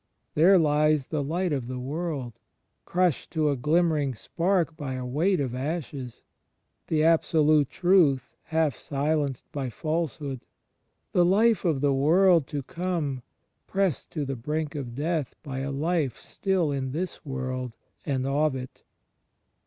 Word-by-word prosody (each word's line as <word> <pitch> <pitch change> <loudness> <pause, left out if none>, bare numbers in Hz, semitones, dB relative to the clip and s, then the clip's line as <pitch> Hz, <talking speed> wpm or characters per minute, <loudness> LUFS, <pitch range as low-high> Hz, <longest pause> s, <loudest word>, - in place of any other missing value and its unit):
There 180 +6 +6
lies 150 -2 +3
the 155 0 -2
Light 170 +4 -1
of 130 -4 -2
the 130 0 -4
World, 135 -3 -4 0.5
crushed 180 -4 +1
to 155 -3 +2
a - - 0
glimmering 150 -1 +1
spark 170 - 0
by 145 -5 -4
a 130 -1 -4
weight 165 +9 +1
of 130 -4 -1
ashes; 135 -3 -4 0.6
the 155 -1 +1
Abso 160 -1 +3
lute 150 -3 +4
Truth, 170 -8 +3
half 160 -3 +1
silenced 145 -2 -1
by 135 -3 -3
Falsehood; 155 -2 -3 0.7
the 180 - +4
Life 210 +4 +3
of 155 -6 +1
the 145 -1 +3
World 165 +3 +4
to 145 -2 -4
come 165 -5 -2 0.5
pressed 195 -6 0
to 150 -3 -2
the 135 0 -3
brink 150 +5 -3
of 125 -5 -5
death 155 -1 -2
by 135 -3 -5
a 135 +1 -3
life 145 -2 -1
still 185 -6 -1
in 135 -2 -2
this 180 +4 -4
world, 130 -3 -4 0.3
and 130 -3 -1
of 145 +1 +1
it. 130 -1 -8
150 Hz, 145 wpm, -27 LUFS, 135-165 Hz, 0.7 s, There